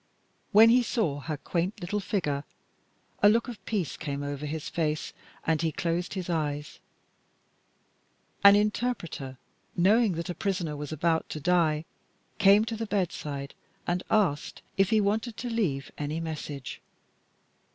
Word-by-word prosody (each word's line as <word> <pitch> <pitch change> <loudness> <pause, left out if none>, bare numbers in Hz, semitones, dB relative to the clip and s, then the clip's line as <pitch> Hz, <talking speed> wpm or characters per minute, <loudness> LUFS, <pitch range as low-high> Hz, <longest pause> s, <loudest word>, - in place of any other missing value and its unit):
When 220 +2 +8
he 250 +1 +6
saw 205 - 0
her 145 +2 -4
quaint 180 +8 -2
little 190 +3 -2
figure, 150 -9 -1 0.8
a 205 - +8
look 230 +3 +3
of 225 -6 -8
peace 195 -10 -1
came 145 -2 -4
over 145 +1 -4
his 155 0 -4
face 155 -2 -1 0.3
and 160 -1 +2
he 165 -1 +1
closed 170 +4 -2
his 185 -2 -3
eyes. 150 -3 -2 1.6
An 200 0 +10
interpreter, 205 - -1 0.4
knowing 205 +4 +4
that 170 +2 -4
a - - -3
prisoner 175 -5 -2
was 145 0 -6
about 160 +1 0
to 155 - -4
die, 160 -1 +2 0.5
came 200 +2 +6
to 225 0 -3
the 225 0 -4
bedside 150 -8 -2 0.3
and 175 +1 0
asked 180 -9 +1
if 195 -1 +3
he 220 - +4
wanted 220 +3 0
to 245 0 -4
leave 155 -12 -1
any 150 +2 -2
message. 150 -4 -5
170 Hz, 145 wpm, -28 LUFS, 150-205 Hz, 1.6 s, An